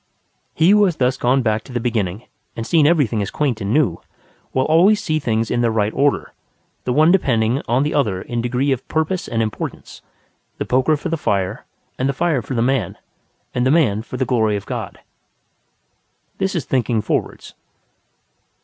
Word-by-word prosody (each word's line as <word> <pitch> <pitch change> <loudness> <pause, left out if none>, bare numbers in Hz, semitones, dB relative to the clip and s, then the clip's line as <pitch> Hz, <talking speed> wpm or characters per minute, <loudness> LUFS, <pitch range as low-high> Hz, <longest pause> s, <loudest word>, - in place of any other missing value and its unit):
He 165 +4 +4
who 210 0 +5
has 180 -4 0
thus 130 -2 +1
gone 130 +1 +1
back 110 -1 0
to - - -13
the 120 - -2
beginning, 110 -3 -2 0.3
and 115 - -4
seen 155 +1 +4
everything 140 -10 +2
as 100 - -3
quaint 130 -7 -1
and 100 +1 -2
new, 125 - +1 0.5
will 130 0 +1
always 185 +7 +4
see 155 -8 -1
things 115 -5 -1
in 120 - +1
their 120 - +2
right 110 -1 0
order, 145 0 0 0.5
the 125 - 0
one 155 +6 +4
depending 125 -8 +2
on 125 +4 +2
the 150 - -1
other 105 -11 +1
in 120 +5 -4
degree 125 +4 0
of 130 -2 -2
purpose 160 +3 -1
and 115 -1 0
importance: 110 -2 -6 0.6
the - - -3
poker 130 +5 +2
for 170 - -5
the 165 - -1
fire 100 -4 -2 0.3
and 130 +2 +1
the - - 0
fire 160 -3 0
for 130 +4 -5
the 115 - +1
man 130 -7 0 0.6
and 125 - 0
the 130 - +2
man 130 -9 +3
for 125 +2 -7
the 130 - 0
glory 110 -5 +1
of 100 - -5
God. - - -5 1.4
This 190 0 -1
is 165 - -2
thinking 120 -4 0
forwards. - - -3
125 Hz, 190 wpm, -20 LUFS, 110-150 Hz, 1.4 s, who